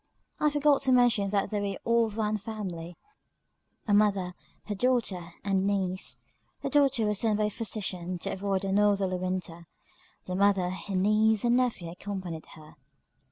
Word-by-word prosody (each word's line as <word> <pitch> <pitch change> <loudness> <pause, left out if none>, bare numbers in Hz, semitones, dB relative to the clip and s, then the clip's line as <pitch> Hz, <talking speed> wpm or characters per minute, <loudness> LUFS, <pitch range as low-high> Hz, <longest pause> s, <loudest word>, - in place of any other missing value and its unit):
I 300 - +3
forgot 290 -1 +3
to 270 -1 +2
mention 240 -5 +4
that 200 +1 0
they 205 -1 -1
were 200 -1 -2
all 235 0 +3
of 215 0 -9
one 215 -1 0
family, 190 -6 -6 0.9
a 205 - +2
mother, 200 -3 +2 0.3
her 210 - -3
daughter, 200 -7 -1
and 195 -1 +1
niece. 190 -2 -1 0.4
The - - -2
daughter 275 -6 +3
was 210 -1 +1
sent 220 -2 +2
by 215 - +1
her 210 - +1
physician, 190 -5 -3
to - - -4
avoid 195 0 -2
a 195 - -1
northerly 200 -2 +2
winter; 180 -2 -4 0.6
the 180 - -4
mother, 195 -1 +2
her 190 +1 -5
niece, 215 +3 +3
and 240 0 +3
nephew, 235 -9 0
accompanied 180 -3 -6
her. 155 -1 -15
200 Hz, 165 wpm, -28 LUFS, 185-220 Hz, 0.9 s, mention